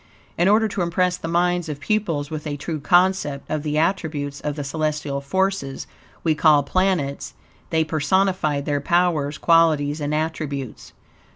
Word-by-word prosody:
In 175 - +2
order 220 +2 +4
to 200 -2 -3
impress 180 +1 +1
the 165 - -6
minds 175 0 +1
of 145 -2 -5
pupils 160 -4 -1
with 155 0 -5
a 145 -1 -3
true 155 +2 -4
concept 175 -3 +2
of 155 -1 -1
the 150 0 -2
attributes 155 -5 -1
of 150 -1 -3
the 145 - -4
celestial 150 -1 -2
forces, 190 -2 -1 0.4
we 160 - +3
call 150 -1 +4
planets, 180 -4 -1 0.3
they 160 -1 +2
personified 155 -1 0
their 145 -1 -1
powers, 165 -3 +1
qualities, 155 -3 +3
and 145 0 -2
attributes. 150 -5 -4
155 Hz, 155 wpm, -22 LUFS, 145-175 Hz, 0.4 s, order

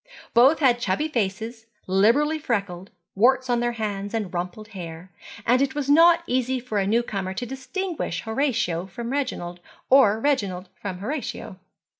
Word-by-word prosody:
Both 260 +7 +6
had 250 -5 +3
chubby 200 +7 0
faces, 225 -1 -3 0.2
liberally 235 +12 +3
freckled, 200 -8 -3 0.2
warts 255 +4 +3
on 240 - +2
their 240 0 0
hands, 205 -2 -4
and 210 -5 -3
rumpled 180 +5 -5
hair; 175 -3 -9 0.3
and 250 +3 +3
it 275 0 0
was 285 -1 0
not 335 +2 +6
easy 255 -1 0
for 235 -4 -2
a 195 - 0
new 230 +4 +2
comer 190 -4 -4
to 245 - -3
distinguish 320 - -4
Horatio 220 - -1
from 235 +6 -6
Reginald, 250 -11 -3 0.3
or 225 -6 +6
Reginald 200 -9 -1
from 190 -3 -6
Horatio. 225 -3 -5
230 Hz, 155 wpm, -24 LUFS, 195-260 Hz, 0.3 s, Both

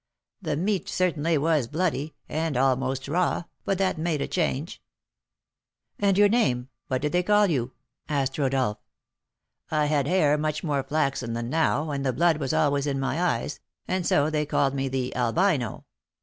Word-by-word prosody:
The 155 -5 -1
meat 190 +3 -1
certainly 170 -3 +1
was 150 -4 +1
bloody, 155 -1 -2
and 155 -3 -2
almost 130 0 +1
raw, 175 +2 0 0.2
but 195 - 0
that 190 -4 0
made 160 -2 0
a 140 - -2
change." 160 -2 -2 1.2
"And 200 -2 +2
your 205 0 +7
name? 130 - +1 0.2
What 130 +1 -2
did 150 - 0
they 180 - +2
call 210 +3 +4
you?" 130 -9 -1 0.4
asked 135 -2 -1
Rodolph. 130 -6 0 0.9
"I 155 -1 +1
had 145 -2 +1
hair 150 -4 +3
much 155 0 -2
more 145 -4 0
flaxen 135 -4 -1
than 115 +1 -3
now, 160 -1 +1
and 140 -1 -2
the 130 -2 0
blood 165 +4 +3
was 135 -4 -2
always 145 -1 +1
in 135 -1 -1
my 135 +5 -1
eyes, 150 -5 -1 0.3
and 185 0 -1
so 150 -2 +2
they 150 -1 +1
called 135 -1 +1
me 135 0 -1
the 130 -1 -2
'Albino.' 125 - 0
150 Hz, 170 wpm, -26 LUFS, 135-170 Hz, 1.2 s, your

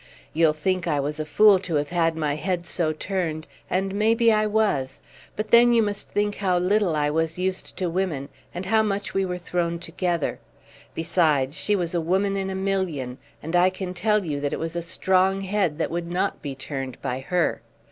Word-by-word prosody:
You'll 160 -1 +4
think 180 +3 -1
I 150 -3 +1
was 150 +2 -2
a 155 - -3
fool 205 +5 +6
to 180 -3 -3
have 145 0 0
had 165 -2 +1
my 150 -2 0
head 175 +2 -2
so 160 -1 0
turned, 160 -1 -3 0.2
and 190 +1 0
maybe 225 +2 +3
I 215 0 +2
was; 205 -12 0 0.4
but 215 +1 -4
then 240 +1 +7
you 230 -1 +4
must 205 -1 -3
think 205 0 -1
how 185 -3 +1
little 185 -1 +2
I 150 -1 +1
was 160 +1 -1
used 185 +1 -3
to 185 - -1
women, 165 -6 -2 0.2
and 180 +2 -6
how 220 +3 +3
much 205 -2 -2
we 195 0 +1
were 180 -1 -3
thrown 170 -1 -2
together. 170 -1 -2 0.6
Besides 160 -5 +1
she 210 - +1
was 175 -3 -1
a 170 - +1
woman 190 +4 +1
in 195 -1 -2
a 190 - -3
million, 185 -10 -2 0.2
and 165 +3 -3
I 180 +1 +5
can 185 -1 -5
tell 210 +2 +1
you 145 -3 -2
that 145 +1 -2
it - - -2
was 165 +1 -4
a 170 - -1
strong 185 +3 +1
head 190 -5 0
that 165 - -1
would 170 0 -3
not 185 +3 -1
be 140 -2 -5
turned 135 -2 -6
by 130 -1 -2
her. 175 +5 0
180 Hz, 210 wpm, -24 LUFS, 155-195 Hz, 0.6 s, then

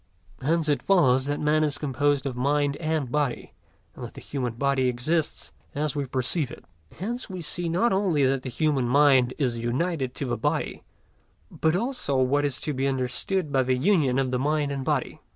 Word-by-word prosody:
Hence 160 +3 +1
it 145 -2 +1
follows 135 -9 +3
that 145 0 -1
man 155 +1 +2
is 150 -2 0
composed 145 0 0
of 135 -3 -3
mind 140 +2 +1
and 155 -6 -2
body, 145 -4 -1 0.4
and - - -9
that - - -8
the - - -8
human 125 -4 -3
body 135 +1 +1
exists 150 +6 -1 0.2
as 150 +1 -1
we 140 -2 -2
perceive 130 +3 -1
it. - - -11 0.3
Hence 235 +8 -4
we 185 -1 -6
see 170 +2 -1
not 190 +8 +2
only 180 -8 +2
that 135 0 +1
the 130 - -5
human 140 -2 0
mind 130 -1 +4
is 125 -5 0
united 130 +3 -1
to 140 - -3
the 120 -2 -2
body, - - -1 0.7
but 160 +1 +1
also 230 - -1
what 135 +3 +2
is 140 -3 -1
to 150 - -2
be 135 +1 0
understood 135 +6 -1
by 135 -2 +3
the 130 0 +1
union 145 -4 +2
of 135 -2 0
the 125 - 0
mind 145 +1 0
and 135 -1 -3
body. - - -2
140 Hz, 195 wpm, -26 LUFS, 130-155 Hz, 0.7 s, mind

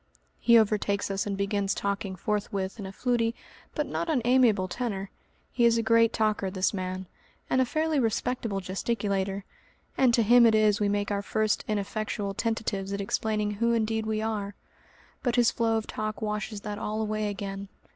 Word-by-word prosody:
He 235 -1 +6
overtakes 205 -2 +1
us 195 +1 -1
and 200 -1 -2
begins 200 0 0
talking 200 -1 -2
forthwith 200 +1 -2
in 195 - -5
a - - -7
fluty, 235 +1 0 0.4
but 300 - 0
not 335 - -3
unamiable, 245 -8 +3
tenor. 200 -2 -4 0.4
He 245 - +1
is 230 0 +5
a 230 - +1
great 230 0 +4
talker, 215 -4 0
this 185 +1 0
man, 185 -1 -4 0.5
and 260 - +4
a - - +3
fairly 310 +3 0
respectable 225 -3 -1
gesticulator, 195 0 -2 0.5
and 260 -2 +4
to 230 - +3
him 235 +2 +7
it 220 - +4
is 215 -1 +4
we 205 - +2
make 205 0 -1
our 200 0 0
first 215 +1 0
ineffectual 210 0 -2
tentatives 205 -3 -2
at 200 - -2
explaining 210 +1 -1
who 235 +3 +1
indeed 220 -1 0
we 215 0 -1
are; 205 -2 -3 0.7
but 245 -2 0
his 240 -2 +4
flow 225 -1 +1
of 220 - -3
talk 215 0 -4
washes 210 -1 -3
that 210 0 -5
all 215 +1 -3
away 215 -1 -1
again. 195 0 -5
215 Hz, 175 wpm, -28 LUFS, 200-230 Hz, 0.7 s, him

